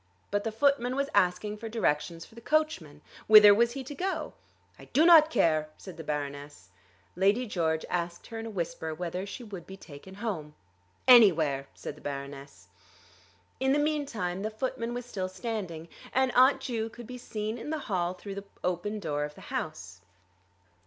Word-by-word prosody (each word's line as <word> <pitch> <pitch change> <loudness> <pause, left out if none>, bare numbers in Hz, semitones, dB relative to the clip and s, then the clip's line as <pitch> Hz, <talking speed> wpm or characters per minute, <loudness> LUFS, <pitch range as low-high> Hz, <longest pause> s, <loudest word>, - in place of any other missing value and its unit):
But 205 0 0
the 225 - -2
footman 255 +1 +2
was 280 +1 -1
asking 185 +4 +1
for 225 +1 -7
directions 165 -6 -1
for - - -20
the 235 - -12
coachman. 225 - -1 0.2
Whither 210 -1 +10
was 235 +3 +2
he 275 - -5
to 270 - -8
go? 340 -2 -3 0.5
"I - - -12
do 310 +4 +3
not 320 -3 +8
care," 155 - +2
said 185 - -10
the 160 - -8
Baroness. 145 - -5 0.4
Lady 200 +7 +2
George 160 -6 -1
asked 175 -1 -3
her 225 -1 -7
in 225 - -5
a - - -5
whisper 170 -5 -4
whether 180 +3 -4
she 240 - -7
would 195 -7 -9
be 190 - -9
taken 180 +2 -12
home. 185 -9 -4 0.5
"Anywhere," 160 - +6
said - - -6
the 150 - -17
Baroness. 140 -8 -7 0.9
In 265 +1 +2
the - - +3
meantime 280 -12 -1
the 215 - -2
footman 230 +1 -3
was 245 -1 -5
still 190 -6 -4
standing, 185 -7 -5 0.3
and 260 -1 +2
Aunt 260 +3 +5
Ju 225 -3 -3
could 240 +1 -11
be 250 +2 -8
seen 215 0 -4
in 295 - -7
the 315 - -1
hall 180 -3 -1
through 195 +2 -8
the 200 0 -7 0.2
open 185 +4 -2
door 145 -6 -2
of 150 0 -6
the - - -13
house. - - -5
205 Hz, 180 wpm, -29 LUFS, 165-240 Hz, 0.9 s, Whither